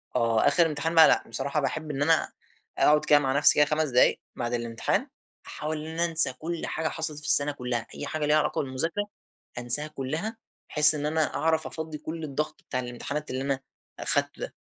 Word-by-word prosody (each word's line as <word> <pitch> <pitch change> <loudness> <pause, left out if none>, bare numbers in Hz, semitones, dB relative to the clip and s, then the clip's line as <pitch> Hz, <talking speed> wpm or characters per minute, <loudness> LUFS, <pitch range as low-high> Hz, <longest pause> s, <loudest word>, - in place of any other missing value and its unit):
آه. 115 +2 +2
آخر 165 +4 +4
امتحان 160 +1 -2
بقى 160 - +9
لأ، - - +3
بصراحة 140 +3 -2
باحب 150 +3 -3
إن 140 0 -4
أنا 160 +2 +2 0.5
أقعد 150 0 +4
كده 145 - +6
مع 135 -1 0
نفْسي 150 - +6
كده 150 - +5
5 150 0 0
دقايق 125 0 +3 0.2
بعد 120 0 -3
الامتحان 115 -1 -1 0.4
أحاول 155 +1 -4
إن 160 - -7
أنا 170 +1 +1
أنسى 165 -6 +5
كل 165 +5 -5
حاجة 160 0 -2
حصلت 155 -2 -4
في 150 - -11
السَنة 145 0 +2
كلها، 125 -4 -4
أي - - -5
حاجة 155 -1 -2
ليها 150 +1 +3
علاقة 150 0 0
بالمذاكرة 165 +9 -2 0.5
أنساها 120 +5 +2
كلها، 155 - -4 0.3
بحيث 150 0 +5
إن 145 - -3
أنا 155 +1 0
أعرف 160 0 0
أفضّي 160 -1 -6
كل 160 +2 -7
الضغط 150 +1 -4
بتاع 130 - -1
الامتحانات 130 +5 -5
اللي 130 +1 -3
أنا 135 -1 -1 0.4
أخدته - - -1
ده، - - -5
150 Hz, 195 wpm, -26 LUFS, 135-160 Hz, 0.5 s, بقى